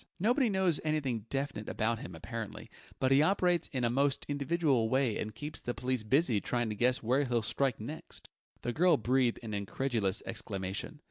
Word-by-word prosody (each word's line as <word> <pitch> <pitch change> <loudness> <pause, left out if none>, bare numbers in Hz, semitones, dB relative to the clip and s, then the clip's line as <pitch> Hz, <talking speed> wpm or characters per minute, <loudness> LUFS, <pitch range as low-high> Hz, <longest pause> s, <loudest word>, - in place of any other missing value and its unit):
Nobody 240 +6 +3
knows 190 -5 +2
anything 135 -8 -1
definite 135 -6 -3
about 115 +1 0
him, 90 - -8
apparently, 110 +6 -6 0.3
but 130 - +2
he 135 +2 +6
operates 180 0 +2
in 130 -3 -2
a 120 - +3
most 140 +2 +1
individual 145 -4 +1
way 130 -4 +1
and 110 -1 -4
keeps 150 +6 -6
the 120 - -3
police 130 -1 -1
busy 120 -1 +2
trying 120 -2 -1
to 105 - -3
guess 125 +4 +2
where 130 +5 +2
he'll 120 -4 0
strike 130 +3 +1
next." 145 +9 -8 0.4
The 120 - -1
girl 175 +1 +4
breathed 125 +1 +2
an 110 -2 -5
incredulous 100 0 -1
exclamation. 100 +8 -4
130 Hz, 180 wpm, -32 LUFS, 110-145 Hz, 0.4 s, he